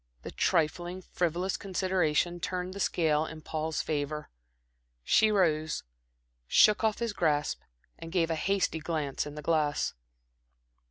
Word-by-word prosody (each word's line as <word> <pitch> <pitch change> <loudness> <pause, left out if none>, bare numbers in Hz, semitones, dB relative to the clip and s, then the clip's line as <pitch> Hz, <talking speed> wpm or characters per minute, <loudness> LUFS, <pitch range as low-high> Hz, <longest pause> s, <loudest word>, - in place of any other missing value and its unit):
The - - -6
trifling, 175 +3 0
frivolous 175 +2 -1
consideration 180 -3 0
turned 180 +1 -3
the 200 - -7
scale 155 -5 +2
in 160 -1 -9
Paul's 155 0 -2
favor. 150 0 -3 0.7
She 215 - +4
rose, 155 -6 +1 0.6
shook 210 - +5
off 220 -1 +2
his 235 -3 -2
grasp, 150 -5 0 0.4
and 165 - -8
gave 170 -2 +1
a - - +1
hasty 190 0 0
glance 150 -3 -2
in 150 - -8
the 150 - -7
glass. 150 -2 +1
165 Hz, 130 wpm, -29 LUFS, 155-185 Hz, 0.7 s, shook